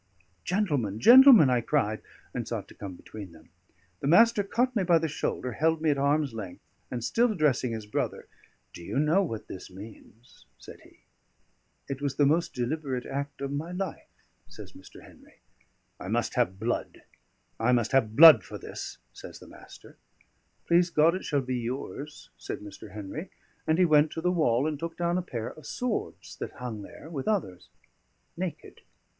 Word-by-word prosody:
"Gentlemen, 145 - -1
gentlemen," 240 - +8
I 125 -1 +2
cried, 115 -4 0 0.3
and - - -4
sought - - -4
to - - -13
come 95 -3 -8
between 100 -2 -11
them. 80 0 -19 0.5
The - - -3
Master 225 +7 +5
caught 245 +5 0
me 205 - +1
by 175 -2 +4
the 165 0 -1
shoulder, 130 -3 -3
held 160 +6 +1
me 155 -1 +2
at 140 - -1
arm's 140 -1 +1
length, 100 -5 -8 0.3
and 120 -2 -4
still 235 - +2
addressing 145 - +1
his 110 -2 -5
brother: 105 - -3 0.5
"Do 85 - -10
you 85 - -4
know 155 +7 +3
what 115 - -4
this 95 - -9
means?" 105 - -14
said - - -13
he. - - -21 0.9
"It 135 0 -5
was 140 -2 -2
the 145 - +3
most 160 +4 +1
deliberate 130 0 -3
act 140 +1 -5
of 140 0 -3
my 155 +5 -4
life," 185 -2 -5 0.4
says - - -12
Mr. - - -15
Henry. - - -19 0.6
"I - - -8
must - - -1
have 95 +2 0
blood, 120 +3 -3 0.6
I 115 +2 +2
must 120 -3 +1
have 110 -5 +2
blood 160 +2 +10
for - - -8
this," - - -8 0.2
says - - -11
the - - -14
Master. - - -15 0.7
"Please 175 +1 +3
God 165 0 +4
it 185 - -5
shall 145 -2 0
be 130 0 -2
yours," 135 +4 -6
said - - -6
Mr. 105 0 -11
Henry; 105 - -7 0.4
and 160 - +2
he 185 - +5
went 155 -1 +4
to 160 - -4
the 180 +1 +1
wall 140 -7 +2
and 155 -2 -2
took 165 +1 -6
down 175 +1 0
a - - -2
pair 120 -10 -5
of 155 -2 -13
swords 250 -3 -4
that - - -6
hung 120 -4 -6
there 125 - -12
with 135 -5 -5
others, 95 - -2 0.7
naked. 170 -4 -6
145 Hz, 180 wpm, -28 LUFS, 115-170 Hz, 0.9 s, blood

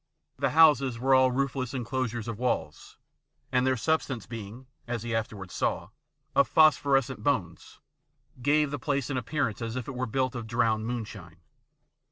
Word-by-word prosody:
The - - +2
houses 140 -6 +5
were 135 +3 +2
all 130 0 +6
roofless 135 0 -2
enclosures 120 -2 -3
of 115 -2 -5
walls, 120 -11 -3 0.5
and 130 0 +2
their 130 -1 +2
substance 135 -1 -1
being, 115 +2 -8 0.2
as 120 -2 -3
he 120 0 -3
after 115 +1 -2
wards 95 -2 -9
saw, - - -1 0.5
of - - +5
phosphorescent 140 -4 +3
bones, 95 - -2 0.6
gave 145 +2 +2
the 145 - -3
place 140 +1 -1
an 135 - -1
appearance 125 -2 -2
as 115 0 -4
if 125 -2 -4
it 135 - -5
were 130 0 -3
built 130 +2 0
of 120 -3 -6
drowned 110 -1 +1
moonshine. 105 -8 -6
125 Hz, 165 wpm, -28 LUFS, 115-135 Hz, 0.6 s, all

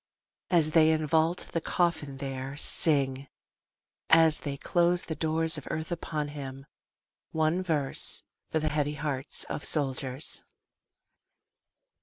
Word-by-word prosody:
As 165 -4 +2
they 155 -1 +4
invault 160 +2 0
the 165 - -2
coffin 160 -7 -2
there, 135 0 -6
Sing 140 -4 +1 0.8
as 160 -1 +5
they 140 -2 -5
close 175 +4 +1
the 160 - -4
doors 160 0 +1
of 140 - -15
earth 160 +2 -5
upon 155 -3 -4
him 135 -2 -9 0.6
one 160 +3 0
verse, 155 -7 +3 0.3
For - - -1
the 155 0 -1
heavy 150 0 -2
hearts 145 -2 -1
of - - -6
soldiers. 135 -1 +2
155 Hz, 120 wpm, -28 LUFS, 140-160 Hz, 0.8 s, as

